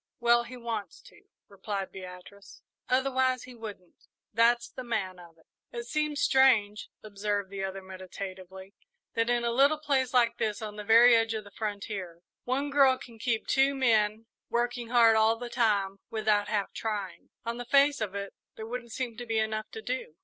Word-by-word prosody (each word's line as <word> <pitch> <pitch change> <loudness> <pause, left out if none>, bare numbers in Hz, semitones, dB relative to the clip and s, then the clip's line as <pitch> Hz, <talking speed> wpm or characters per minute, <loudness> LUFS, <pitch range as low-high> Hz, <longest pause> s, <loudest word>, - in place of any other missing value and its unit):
"Well, 235 0 +4
he 250 +1 -9
wants 230 -4 -5
to," - - -19 0.2
replied 200 -1 -5
Beatrice, 185 +1 -12 0.3
"otherwise 260 -1 +1
he 255 - -11
wouldn't. 210 -6 -11 0.3
That's 235 +1 +3
the 255 - -8
man 190 -6 -3
of 170 -2 -15
it." 160 - -25 0.3
"It 235 - -5
seems 300 +3 -1
strange," 225 -6 +3
observed 205 -1 -3
the 195 -1 -4
other, 195 0 -5
meditatively, 190 0 -9 0.4
"that 230 +1 0
in 240 0 +1
a 235 - +1
little 280 +5 +4
place 275 -4 0
like 235 -2 +2
this, 210 -1 -1
on 215 -1 -6
the 210 - -6
very 230 +3 +7
edge 225 0 +1
of 215 - -4
the 200 - -14
frontier, 200 -5 -5 0.2
one 275 +3 -1
girl 270 -2 +5
can 230 -3 -13
keep 230 -1 -1
two 270 +1 +3
men 220 -4 +2 0.2
working 240 0 -1
hard 230 -2 +5
all 220 +1 +4
the 240 +1 -7
time 200 -5 +1
without 210 -2 +1
half 205 -2 -2
trying. 205 -4 -4 0.2
On 230 0 -3
the 245 - -6
face 280 +1 +4
of 200 -2 -3
it, 200 0 -5 0.2
there 220 - -7
wouldn't 235 0 -6
seem 240 -3 -4
to 245 - -6
be 225 -1 0
enough 220 0 -1
to 220 - -9
do." 250 -11 -4
225 Hz, 185 wpm, -29 LUFS, 200-245 Hz, 0.4 s, very